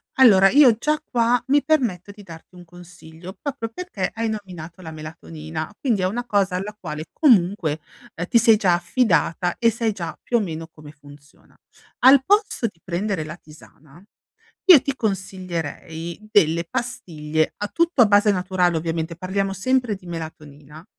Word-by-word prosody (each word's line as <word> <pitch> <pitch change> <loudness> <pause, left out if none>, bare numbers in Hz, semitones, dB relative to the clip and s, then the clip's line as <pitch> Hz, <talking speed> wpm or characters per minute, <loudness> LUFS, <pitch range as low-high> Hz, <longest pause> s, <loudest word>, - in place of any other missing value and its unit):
Allora 200 -8 +6
io 270 -4 +6
già 305 +5 0
qua 240 -4 +1
mi 285 +2 +3
permetto 225 - 0
di 205 0 -14
darti 165 +1 -14
un 180 - -12
consiglio 175 +1 -13
proprio 260 -6 -5
perché 225 - -4
hai 225 0 -2
nominato 185 -5 -8
la 160 - -8
melatonina; 155 0 -8
quindi 230 -8 0
è 185 - +1
una 240 +6 -4
cosa 200 -5 0
alla 200 +3 -5
quale 150 -4 -6
comunque 180 - +2 0.5
ti 235 - +4
sei 225 -1 +6
già 185 -4 +2
affidata 175 -2 0
e 230 - +4
sai 230 0 -1
già 170 -5 -6
più 240 - +1
o - - +2
meno 165 -5 -5
come 150 -1 -13
funziona. 145 -1 -19 0.4
Al 265 +1 +6
posto 410 - +1
di 175 -5 -13
prendere 185 -1 -2
la 155 +1 -7
tisana, 155 0 -18 0.6
io 355 -8 +9
ti 275 -2 -3
consiglierei 180 - -5
delle 170 -3 +3
pastiglie 160 -11 -3
a 205 0 -3
tutto 335 -5 +2
a 225 - +6
base 205 0 +4
naturale 180 -2 0
ovviamente, 165 +1 -3
parliamo 195 +2 -2
sempre 245 +3 0
di 185 -2 -14
melatonina, 155 -2 -9
185 Hz, 160 wpm, -22 LUFS, 165-230 Hz, 0.6 s, io